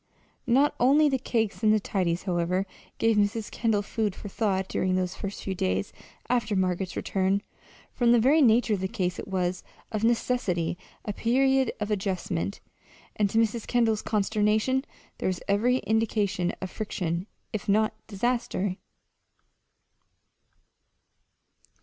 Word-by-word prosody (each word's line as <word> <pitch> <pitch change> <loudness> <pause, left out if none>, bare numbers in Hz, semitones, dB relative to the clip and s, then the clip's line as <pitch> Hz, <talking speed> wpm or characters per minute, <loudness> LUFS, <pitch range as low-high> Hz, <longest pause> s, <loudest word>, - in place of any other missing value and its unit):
Not 270 +5 +4
only 290 +5 +5
the 265 -1 0
cakes 225 -4 -1
and 215 -1 +4
the 215 - +4
tidies, 180 -4 -1
however, 180 +1 0 0.3
gave 225 -1 +2
Mrs. 210 +1 0
Kendall 220 -3 +1
food 210 -2 -2
for 205 - -8
thought 190 -2 0
during 185 0 0
those 185 0 -1
first 200 0 -6
few 195 - -2
days 95 - -1 0.3
after 230 -4 +1
Margaret's 185 0 0
return. 195 +1 0 0.5
From 240 -1 +3
the 240 - +6
very 280 +7 +4
nature 235 -3 +4
of 200 - 0
the 190 - -1
case 185 -4 -2
it - - -6
was, 185 -2 -1 0.3
of 215 0 -2
necessity, 225 -8 +1 0.3
a 210 - -2
period 265 +3 +2
of 210 0 -2
adjustment; 190 -1 -2 0.5
and 205 -2 +2
to 220 - -1
Mrs. 225 0 +1
Kendall's 225 -3 +2
consternation 215 +5 +1 0.3
there - - -1
was 185 -2 -2
every 230 +6 +3
indication 215 -6 0
of 185 - -5
friction, 180 -4 -3 0.3
if 210 0 -4
not 215 +2 +3
disaster. 220 -3 -1
210 Hz, 140 wpm, -27 LUFS, 190-230 Hz, 0.5 s, the